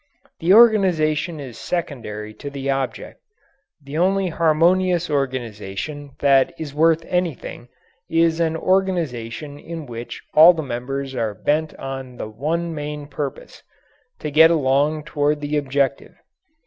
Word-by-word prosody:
The 170 Hz, +3 st, +1 dB
organization 180 Hz, -8 st, +4 dB
is 130 Hz, -5 st, -8 dB
secondary 115 Hz, -11 st, -4 dB
to 145 Hz, -, -8 dB
the 140 Hz, -1 st, -3 dB
object. 135 Hz, -1 st, -4 dB, 0.6 s
The 140 Hz, +3 st, -4 dB
only 190 Hz, +1 st, +2 dB
harmonious 170 Hz, +2 st, +2 dB
organization 130 Hz, +1 st, -4 dB
that 135 Hz, -2 st, +4 dB
is 150 Hz, -3 st, -6 dB
worth 160 Hz, +2 st, +3 dB
anything 175 Hz, -8 st, -3 dB, 0.4 s
is 165 Hz, 0 st, +2 dB
an 160 Hz, -1 st, +1 dB
organization 155 Hz, -8 st, -1 dB
in 165 Hz, -1 st, -7 dB
which 120 Hz, -2 st, -8 dB
all 160 Hz, +4 st, +9 dB
the 160 Hz, -2 st, -4 dB
members 135 Hz, +2 st, -4 dB
are 110 Hz, -5 st, -2 dB
bent 155 Hz, +8 st, -1 dB
on 135 Hz, -2 st, -7 dB
the -, -, -5 dB
one 160 Hz, +9 st, -2 dB
main 150 Hz, -1 st, -5 dB
purpose 145 Hz, -1 st, -6 dB, 0.6 s
to 150 Hz, -, -3 dB
get 160 Hz, +3 st, +7 dB
along 150 Hz, 0 st, +1 dB
toward 145 Hz, 0 st, 0 dB
the 145 Hz, +1 st, -3 dB
objective. 140 Hz, -1 st, -1 dB
150 Hz, 130 wpm, -21 LUFS, 135-165 Hz, 0.6 s, all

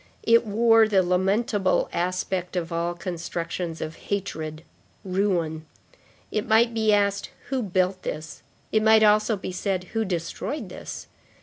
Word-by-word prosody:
It 230 Hz, 0 st, +4 dB
wore 225 Hz, +1 st, +5 dB
the 195 Hz, -3 st, +3 dB
lamentable 195 Hz, +2 st, +1 dB
aspect 180 Hz, +1 st, -2 dB
of 170 Hz, -1 st, -2 dB
all 170 Hz, +1 st, -1 dB
constructions 170 Hz, -1 st, -4 dB
of 160 Hz, +1 st, -5 dB
hatred, 160 Hz, -6 st, -3 dB, 0.4 s
ruin. 175 Hz, -5 st, -1 dB, 0.6 s
It 215 Hz, -, -2 dB
might 230 Hz, +2 st, +4 dB
be 220 Hz, -1 st, +2 dB
asked: 200 Hz, -1 st, +1 dB, 0.2 s
Who 265 Hz, -2 st, 0 dB
built 185 Hz, -2 st, 0 dB
this? 155 Hz, +1 st, -6 dB, 0.3 s
It 215 Hz, -, +3 dB
might 220 Hz, 0 st, +6 dB
also 215 Hz, +1 st, +4 dB
be 185 Hz, -, -5 dB
said: 185 Hz, 0 st, -2 dB
Who 225 Hz, 0 st, +1 dB
destroyed 180 Hz, -, -4 dB
this? -, -, -8 dB
190 Hz, 135 wpm, -25 LUFS, 175-215 Hz, 0.6 s, might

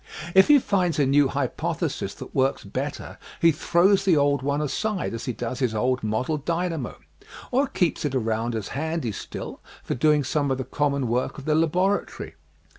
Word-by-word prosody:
If 190 Hz, 0 st, +7 dB
he 295 Hz, -, +8 dB
finds 185 Hz, -, +1 dB
a 145 Hz, -, +3 dB
new 140 Hz, +1 st, +4 dB
hypothesis 135 Hz, -2 st, -2 dB
that -, -, -10 dB
works 135 Hz, +1 st, +1 dB
better 135 Hz, +8 st, -5 dB, 0.2 s
he 165 Hz, -, +5 dB
throws 185 Hz, +6 st, +3 dB
the 185 Hz, -5 st, +4 dB
old 140 Hz, -1 st, +2 dB
one 140 Hz, +2 st, 0 dB
aside 190 Hz, -, -2 dB
as 115 Hz, 0 st, -5 dB
he -, -, -1 dB
does 120 Hz, +2 st, -5 dB
his 125 Hz, -5 st, 0 dB
old 125 Hz, +4 st, +1 dB
model 110 Hz, +8 st, -1 dB
dynamo, 165 Hz, -2 st, -2 dB, 0.5 s
or 270 Hz, +3 st, +2 dB
keeps 180 Hz, -10 st, 0 dB
it 145 Hz, -3 st, -1 dB
around 115 Hz, -1 st, -1 dB
as 110 Hz, -3 st, -4 dB
handy 160 Hz, -4 st, -2 dB
still -, -, -7 dB, 0.2 s
for -, -, -2 dB
doing 150 Hz, +3 st, +3 dB
some 145 Hz, +1 st, 0 dB
of 130 Hz, -, 0 dB
the 130 Hz, -, -3 dB
common 140 Hz, 0 st, -1 dB
work 120 Hz, +3 st, -1 dB
of 140 Hz, -, -9 dB
the 155 Hz, -, +2 dB
laboratory. 180 Hz, +6 st, 0 dB
145 Hz, 185 wpm, -25 LUFS, 130-165 Hz, 0.5 s, he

